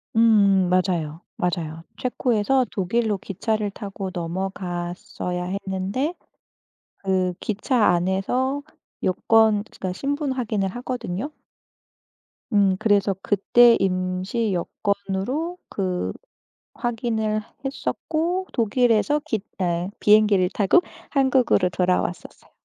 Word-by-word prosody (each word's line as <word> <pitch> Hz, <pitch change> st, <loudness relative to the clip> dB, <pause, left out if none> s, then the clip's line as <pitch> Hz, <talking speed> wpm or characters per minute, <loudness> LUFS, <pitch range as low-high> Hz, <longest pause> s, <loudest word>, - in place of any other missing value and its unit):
음 200 Hz, -5 st, +5 dB
맞아요. 175 Hz, -4 st, 0 dB, 0.2 s
맞아요. 165 Hz, -2 st, -2 dB
체코에서 250 Hz, 0 st, +1 dB
독일로 210 Hz, +2 st, 0 dB
기차를 210 Hz, +2 st, -2 dB
타고 195 Hz, -2 st, -6 dB
넘어갔어야 180 Hz, 0 st, -4 dB
했는데 195 Hz, -, -2 dB, 0.8 s
그 185 Hz, -2 st, 0 dB
기차 215 Hz, +2 st, 0 dB
안에서 195 Hz, +11 st, +1 dB, 0.4 s
여권 215 Hz, +2 st, +3 dB
그니까 185 Hz, -4 st, -5 dB
신분 280 Hz, -, -2 dB
확인을 215 Hz, -6 st, -1 dB
하거든요. 245 Hz, +1 st, -4 dB, 1.2 s
음 200 Hz, -3 st, +4 dB
그래서 200 Hz, -1 st, +2 dB
그때 230 Hz, +5 st, +5 dB
임시 185 Hz, +3 st, 0 dB
여권으로 200 Hz, -, -2 dB
그 185 Hz, -2 st, -2 dB, 0.6 s
확인을 220 Hz, -3 st, -1 dB, 0.2 s
했었고 330 Hz, +6 st, -2 dB
독일에서 240 Hz, +4 st, +2 dB
깃 215 Hz, -3 st, -2 dB, 0.2 s
네 175 Hz, 0 st, 0 dB
비행기를 210 Hz, -3 st, +5 dB
타고 210 Hz, -, +4 dB, 0.3 s
한국으로 260 Hz, -9 st, +3 dB
돌아왔었어요. 180 Hz, 0 st, -2 dB
200 Hz, 235 characters per minute, -23 LUFS, 185-240 Hz, 1.2 s, 음